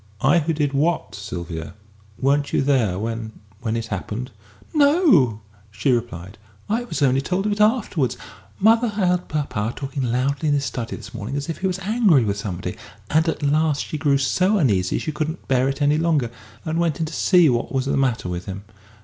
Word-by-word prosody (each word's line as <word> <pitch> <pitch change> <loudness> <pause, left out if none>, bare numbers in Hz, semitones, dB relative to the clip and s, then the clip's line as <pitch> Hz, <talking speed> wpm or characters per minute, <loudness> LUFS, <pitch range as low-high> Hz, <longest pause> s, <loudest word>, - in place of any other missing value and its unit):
"I 145 +6 +4
who 165 +1 -1
did 145 -3 0
what, 155 +5 0
Sylvia? 85 -6 -6 0.4
Weren't 140 +2 +1
you - - +2
there 125 -10 +2
when 110 +1 -4 0.3
when 115 -1 -2
it 115 - -3
happened?" 110 +4 -5 0.4
"No," 285 - +4 0.3
she 105 +6 0
replied. 110 -5 -3 0.3
"I 230 +3 -1
was 170 - -2
only 135 0 +3
told 180 +7 -1
of 210 - +1
it 205 +1 0
afterwards. 210 - +1 0.4
Mother 225 +3 +4
heard 180 -4 0
papa 120 -7 -2
talking 135 0 -4
loudly 130 +5 0
in 145 - +3
his 140 0 0
study 115 -4 -4
this - - -11
morning, 115 +3 -5
as 145 +2 -3
if 165 - -4
he 190 - 0
was 185 -1 -1
angry 195 - +3
with 100 -1 -1
somebody, 95 -3 -5 0.3
and 160 +2 +3
at 160 - -3
last 150 +1 +1
she 155 - -5
grew 140 -2 +3
so 185 +9 +2
uneasy 100 - +2
she 155 - -3
couldn't 155 +2 -4
bear 130 0 +2
it 135 +2 -2
any 145 +2 +3
longer, 155 -8 +1 0.3
and 160 +1 -1
went 165 -4 0
in 160 - 0
to 155 - -7
see 180 +1 +4
what 120 -3 0
was 135 -1 0
the 140 - 0
matter 130 -8 0
with 90 0 -5
him. 95 +1 -6
140 Hz, 200 wpm, -22 LUFS, 115-165 Hz, 0.4 s, I